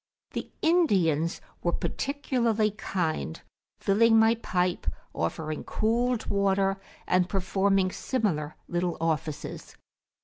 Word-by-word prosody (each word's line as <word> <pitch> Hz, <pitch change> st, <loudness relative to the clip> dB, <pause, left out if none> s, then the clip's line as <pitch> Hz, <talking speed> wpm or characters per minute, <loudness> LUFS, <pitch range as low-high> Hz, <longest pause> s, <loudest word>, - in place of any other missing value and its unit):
The -, -, -4 dB
Indians 185 Hz, -, +3 dB, 0.2 s
were 175 Hz, -, 0 dB
particularly 235 Hz, -6 st, 0 dB
kind, 170 Hz, -, -2 dB, 0.4 s
filling 225 Hz, +3 st, +4 dB
my 225 Hz, +1 st, +6 dB
pipe, 180 Hz, -6 st, -1 dB, 0.3 s
offering 155 Hz, -, -3 dB
cooled 235 Hz, +2 st, 0 dB
water, 195 Hz, -1 st, +1 dB, 0.2 s
and 180 Hz, 0 st, +2 dB
performing 195 Hz, 0 st, +2 dB
similar 180 Hz, -, -1 dB
little 175 Hz, 0 st, -1 dB
offices. 160 Hz, -2 st, -3 dB
195 Hz, 95 wpm, -28 LUFS, 170-225 Hz, 0.4 s, my